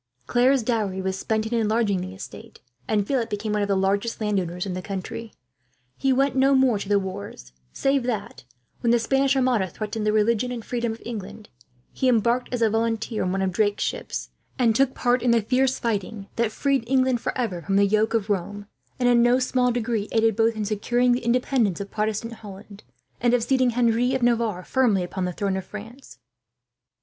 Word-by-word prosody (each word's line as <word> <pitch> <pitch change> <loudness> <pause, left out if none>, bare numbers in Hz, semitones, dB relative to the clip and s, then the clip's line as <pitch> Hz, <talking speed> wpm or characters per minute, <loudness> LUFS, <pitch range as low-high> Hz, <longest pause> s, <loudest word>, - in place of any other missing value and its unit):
Claire's 250 +1 +3
dowry 215 -5 -1
was 190 0 -2
spent 220 +2 -1
in 220 - -4
enlarging 215 -4 +1
the 185 +1 -7
estate, 220 +3 -11 0.3
and 210 -2 +1
Philip 245 -1 -1
became 210 +1 -3
one 210 - +1
of 205 - 0
the 200 -1 +1
largest 200 +4 0
landowners 185 -4 -1
in 190 - -4
the 185 - -4
county. 200 +4 -6 0.6
He 270 - +1
went 270 +1 +2
no 270 +1 +4
more 260 -5 +3
to 200 - -6
the 205 - +4
wars, 190 - -6 0.2
save 275 0 +1
that, 215 - -4 0.4
when 235 - 0
the 240 - +5
Spanish 270 +3 +2
armada 250 -7 +2
threatened 215 +3 -4
the - - +4
religion 225 +3 +1
and 235 -3 -6
freedom 235 -2 -2
of 225 - -12
England, 210 -2 -7 0.4
he 260 - +1
embarked 235 +1 +1
as 245 -2 0
a 225 - +4
volunteer 225 0 -1
in 180 - 0
one 190 0 0
of 190 - 0
Drake's 205 +2 +1
ships, - - -4 0.3
and 230 -3 +3
took 265 +1 +2
part 245 0 +1
in 245 - +1
the 235 -1 +4
fierce 260 +3 +1
fighting 210 -2 -3
that 230 -2 0
freed 275 +2 0
England 260 -2 +2
for - - -3
ever 210 -9 -2
from 195 +2 -1
the 200 0 +5
yoke 215 +3 +1
of 215 -3 0
Rome, 205 +1 -3 0.3
and 245 - +1
in 240 -1 +5
no 240 +1 +4
small 250 -1 +1
degree 230 -3 -2
aided 225 -1 +2
both 225 +1 +2
in 215 -1 -2
securing 240 +4 +1
the 245 0 0
independence 235 -4 +1
of 200 0 -6
Protestant 215 +2 -2
Holland, 205 -1 -12 0.4
and 240 0 +3
of 240 - 0
seating 255 +1 +2
Henry 240 +1 +2
of 260 - -1
Navarre 230 -6 +1
firmly 225 -7 +2
upon 180 +1 -3
the 180 - -2
throne 195 +2 -2
of 190 - -4
France. 225 +6 -10
225 Hz, 205 wpm, -24 LUFS, 205-245 Hz, 0.6 s, the